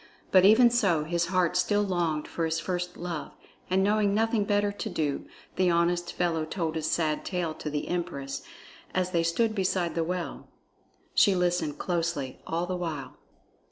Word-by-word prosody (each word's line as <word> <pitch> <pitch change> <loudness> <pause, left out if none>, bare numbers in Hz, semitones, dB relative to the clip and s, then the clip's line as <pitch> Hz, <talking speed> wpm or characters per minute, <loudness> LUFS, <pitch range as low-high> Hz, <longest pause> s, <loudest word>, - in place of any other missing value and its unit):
But 185 -1 +6
even 235 +4 +7
so 195 -10 +2
his 170 +2 0
heart 180 -1 +1
still 205 +3 +2
longed 170 -6 -1
for 165 - -2
his 160 0 0
first 180 0 -3
love, 170 -3 -5 0.4
and 190 +1 +3
knowing 205 0 +2
nothing 225 -1 +2
better 205 0 +2
to 205 +2 -5
do, 150 -6 -2 0.3
the 185 -1 +3
honest 175 +1 +1
fellow 170 -3 0
told 160 0 -2
his 160 -1 -1
sad 155 -3 0
tale 175 -4 -2
to 155 - -5
the 150 0 -3
empress, 140 -6 -3 0.5
as 185 0 +1
they 170 -2 +2
stood 215 +7 +1
beside 185 -4 0
the 165 - 0
well. 180 +1 -4 0.7
She 200 - +5
listened 175 -4 0
closely 170 -7 -2
all 170 +2 -1
the 185 +1 -3
while. 155 -7 -5
175 Hz, 170 wpm, -28 LUFS, 165-190 Hz, 0.7 s, even